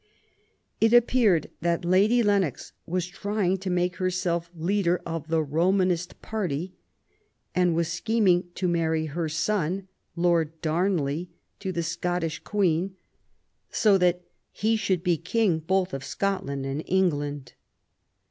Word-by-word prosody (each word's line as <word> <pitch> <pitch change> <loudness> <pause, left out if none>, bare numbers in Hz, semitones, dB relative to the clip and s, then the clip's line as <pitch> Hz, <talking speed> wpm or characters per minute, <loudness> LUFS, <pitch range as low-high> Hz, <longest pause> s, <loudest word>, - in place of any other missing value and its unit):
It 225 +1 +4
appeared 235 - +4
that 170 +1 0
Lady 205 +7 +4
Lennox 195 - 0
was 180 +1 -1
trying 195 0 -1
to 190 0 -4
make 180 0 0
herself 180 -2 -1
leader 175 +1 +1
of 165 -2 -4
the 160 -1 +1
Romanist 180 +3 0
party 185 -5 -3 0.8
and 180 -2 +2
was 170 0 +1
scheming 180 0 +2
to 185 - -1
marry 160 -2 +1
her 160 +2 -3
son. 185 +2 -1 0.3
Lord 170 -2 +1
Darnley, 165 -1 0 0.3
to 190 - -3
the 170 -2 -2
Scottish 170 -1 -2
Queen, 185 0 0 0.7
so 205 -3 +3
that 180 0 +2 0.3
"he 220 +2 +1
should 190 -5 0
be 175 -3 +2
King 185 0 +1
both 185 +3 0
of 135 - -4
Scotland 185 -9 -2
and 135 +2 -3
England". 145 -8 0
180 Hz, 130 wpm, -26 LUFS, 165-190 Hz, 0.8 s, It